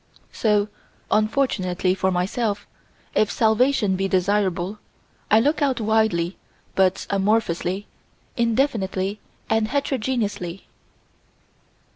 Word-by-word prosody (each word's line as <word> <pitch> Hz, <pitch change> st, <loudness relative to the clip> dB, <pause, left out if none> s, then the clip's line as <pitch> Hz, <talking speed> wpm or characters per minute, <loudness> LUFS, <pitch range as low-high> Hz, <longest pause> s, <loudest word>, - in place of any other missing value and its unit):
So, 210 Hz, -2 st, +2 dB, 0.4 s
unfortunately 215 Hz, -5 st, +1 dB
for 190 Hz, 0 st, 0 dB
myself, 200 Hz, +3 st, -1 dB, 0.5 s
if 215 Hz, -, +3 dB
salvation 220 Hz, -2 st, +2 dB
be 195 Hz, +1 st, 0 dB
desirable, 190 Hz, 0 st, 0 dB, 0.5 s
I 215 Hz, -, +6 dB
look 290 Hz, +7 st, +1 dB
out 270 Hz, -4 st, +1 dB
widely 215 Hz, -5 st, +1 dB, 0.4 s
but 190 Hz, -1 st, +2 dB
amorphously, 195 Hz, -2 st, 0 dB, 0.5 s
indefinitely 220 Hz, -5 st, 0 dB, 0.3 s
and 220 Hz, -1 st, +2 dB
heterogeneously. 235 Hz, -9 st, -2 dB
210 Hz, 85 wpm, -23 LUFS, 190-225 Hz, 0.5 s, I